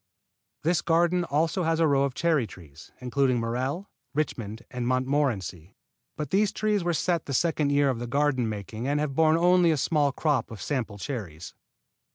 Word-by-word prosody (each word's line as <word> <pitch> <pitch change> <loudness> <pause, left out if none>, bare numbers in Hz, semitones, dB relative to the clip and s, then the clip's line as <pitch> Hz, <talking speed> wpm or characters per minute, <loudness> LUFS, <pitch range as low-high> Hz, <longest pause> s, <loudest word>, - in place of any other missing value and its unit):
This 170 +2 +2
garden 175 +2 +2
has 175 - -3
also 160 +5 +1
a 165 0 +2
row 140 -1 +3
of 135 -2 -4
cherry 160 -8 +1
trees, 80 -6 -14
including 125 0 +1
Morello, 130 - -2 0.3
Richmond 115 -7 -3
and 125 -2 -3
Montmorency; 130 - -1 0.4
but 150 -3 -4
these 200 +1 +3
trees 210 -3 0
were 175 - +1
set 170 0 0
the 140 - -2
second 150 -1 +1
year 140 -1 +3
of 120 - -4
the 120 - -4
garden 135 -2 +1
making 110 +3 -5
and 145 +1 +1
have 150 -2 -1
borne 160 +2 +4
only 175 0 +4
a 155 - +2
small 145 -1 +2
crop 140 -2 0
of 110 - -9
sample 115 -4 -3
cherries. 95 - -6
140 Hz, 180 wpm, -27 LUFS, 120-165 Hz, 0.4 s, borne